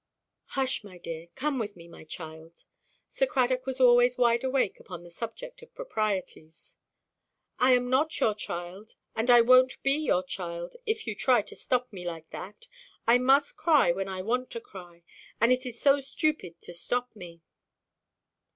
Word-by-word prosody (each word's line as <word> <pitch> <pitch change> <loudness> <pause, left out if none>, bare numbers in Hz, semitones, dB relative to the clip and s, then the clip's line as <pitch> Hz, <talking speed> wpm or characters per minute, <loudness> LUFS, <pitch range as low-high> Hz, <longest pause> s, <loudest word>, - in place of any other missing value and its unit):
"Hush, 265 -3 0
my 190 -3 -12
dear; 165 -1 -7
come 275 0 -1
with 210 -2 -4
me, 170 -1 -13
my 170 - -13
child!" 160 0 -10 0.4
Sir - - 0
Cradock 255 - 0
was 265 0 -3
always 245 0 +5
wide 235 -1 +3
awake 260 -5 0
upon 175 -2 -9
the 175 - -13
subject 235 - -7
of 475 - -17
proprieties. 200 - -4 0.8
"I 255 +1 +5
am 245 0 0
not 280 +5 +1
your 215 - +3
child; 185 +1 -7 0.2
and 225 +3 -1
I 240 -1 +8
wonʼt 255 +2 +5
be 275 - +3
your 290 -11 +1
child, 175 -2 -6
if 440 +1 -1
you 220 - -2
try 240 +1 +3
to - - -10
stop 250 -2 -1
me 180 -2 -7
like 165 -2 -7
that. 210 - -9 0.4
I 240 +2 +5
must 270 +3 +3
cry 305 - +4
when 190 +2 -3
I 190 -1 -5
want 250 +4 -1
to 230 - -4
cry, 175 -5 -13 0.4
and 230 +2 +4
it 255 +1 -2
is 240 -1 -8
so 280 0 +4
stupid 270 - -2
to - - -8
stop 245 +8 -3
me." 170 -4 -11
235 Hz, 175 wpm, -28 LUFS, 180-260 Hz, 0.8 s, I